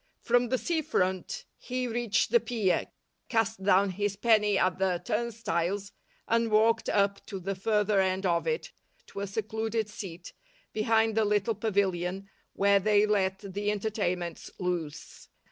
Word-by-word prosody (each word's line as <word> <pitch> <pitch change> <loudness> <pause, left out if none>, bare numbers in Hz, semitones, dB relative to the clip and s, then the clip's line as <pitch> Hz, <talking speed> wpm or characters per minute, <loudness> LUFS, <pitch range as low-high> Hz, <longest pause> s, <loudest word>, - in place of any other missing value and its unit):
From 245 0 +2
the 255 - +2
sea 325 +4 -1
front 190 - -1
he 255 0 -3
reached 235 -3 0
the 475 - +6
pier, 220 - 0 0.4
cast 225 -3 0
down 195 0 +4
his 205 +1 -2
penny 210 -1 +3
at 185 0 +1
the 185 -2 +1
turnstiles, 210 -4 -2 0.4
and 230 0 +2
walked 225 +1 +3
up 200 -1 +1
to 195 -3 -5
the 195 +2 -3
further 210 +1 +1
end 190 +1 0
of 170 -2 +1
it 475 +1 -2 0.3
to - - -8
a 200 - -3
secluded 220 +2 -2
seat 185 -5 -8 0.4
behind 220 +1 +2
the 225 - +3
little 210 +1 +1
pavilion 195 -3 -1 0.3
where 200 0 +4
they 210 +1 +4
let 195 -1 -1
the 205 +1 -1
entertainments 195 -5 -2
loose. 170 -4 -4
205 Hz, 145 wpm, -29 LUFS, 190-225 Hz, 0.4 s, the